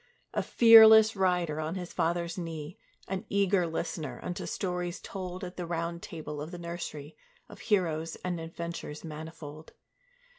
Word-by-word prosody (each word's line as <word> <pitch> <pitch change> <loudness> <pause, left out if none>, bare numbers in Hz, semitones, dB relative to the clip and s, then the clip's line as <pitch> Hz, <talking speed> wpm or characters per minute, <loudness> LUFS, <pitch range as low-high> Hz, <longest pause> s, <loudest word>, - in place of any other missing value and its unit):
A - - +1
fearless 220 -2 +8
rider 180 -5 +1
on 155 +3 -3
his 180 -2 -6
father's 170 +1 -1
knee, 165 -2 -6 0.3
An 190 0 -3
eager 195 -3 +2
listener 160 -5 -4
unto 175 - -4
stories 180 -2 -3
told 185 -2 -6
At 180 0 -7
the 175 -2 -4
Round 170 0 -3
Table 150 -3 -7
of 155 - -6
the 175 - -7
nursery, 170 -3 -6 0.3
Of - - -13
heroes 165 -6 0
and 175 -2 -2
adventures 165 -2 -6
manifold. 155 -1 -9
170 Hz, 145 wpm, -29 LUFS, 160-180 Hz, 0.3 s, fearless